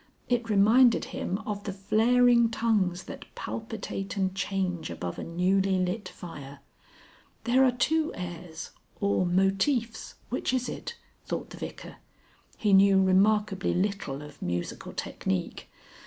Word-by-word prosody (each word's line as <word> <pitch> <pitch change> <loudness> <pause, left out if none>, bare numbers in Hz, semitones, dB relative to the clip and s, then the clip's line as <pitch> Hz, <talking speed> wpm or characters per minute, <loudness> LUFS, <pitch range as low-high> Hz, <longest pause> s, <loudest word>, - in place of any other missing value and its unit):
It 240 -2 0
reminded 220 +4 +5
him 185 - -2
of 205 -1 -4
the 200 - -2
flaring 235 +4 +4
tongues 205 -6 0
that 280 0 -9
palpitate 220 -3 -5
and 190 -1 0
change 190 -4 -2
above 85 -1 -5
a - - -4
newly 190 +3 +1
lit 185 +4 -2
fire. 140 -5 -10 0.8
There 255 +2 +4
are 260 - +5
two 310 +6 +1
airs 175 -2 -7 0.3
or 200 -2 +1
motifs, 195 +6 0
which 255 +1 -1
is 255 -1 0
it? 470 - -6 0.3
thought - - -4
the - - -9
Vicar. - - -8 0.6
He 210 -2 +2
knew 195 0 +6
remarkably 195 +1 +3
little 180 -7 -2
of 150 0 -13
musical 85 0 -4
technique. 95 -1 -3
195 Hz, 130 wpm, -28 LUFS, 180-230 Hz, 0.8 s, knew